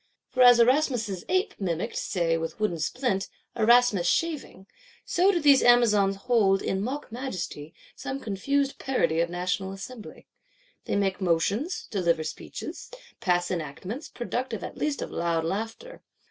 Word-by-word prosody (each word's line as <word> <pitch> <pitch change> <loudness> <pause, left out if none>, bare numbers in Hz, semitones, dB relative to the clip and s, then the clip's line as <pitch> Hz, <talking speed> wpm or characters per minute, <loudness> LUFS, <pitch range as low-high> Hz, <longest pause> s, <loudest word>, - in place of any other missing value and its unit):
For 255 - 0
as 245 -1 +8
Erasmus's 235 - +2
Ape 370 +3 +1
mimicked, 175 -4 -2
say 170 -4 0
with 165 +3 -4
wooden 210 -6 0
splint, 235 - -1 0.3
Erasmus 230 -5 +4
shaving, 300 - -1 0.4
so 375 +2 +3
do 355 - 0
these 285 -3 +6
Amazons 210 -5 +4
hold, 205 -6 +3
in 190 - -1
mock 265 +6 -4
majesty, 185 - -5 0.2
some 270 +1 -5
confused 275 +6 -1
parody 250 - 0
of 170 0 +1
National 180 +2 -2
Assembly. 210 +4 -9 0.6
They - - -1
make 200 -1 0
motions; 195 - 0
deliver 170 -6 +1
speeches; - - -7 0.3
pass 175 -1 +1
enactments; 185 - -5
productive 240 -1 -4
at - - -6
least 300 -2 -2
of - - -7
loud 170 -1 -1
laughter. 225 - -5
210 Hz, 140 wpm, -27 LUFS, 180-260 Hz, 0.6 s, as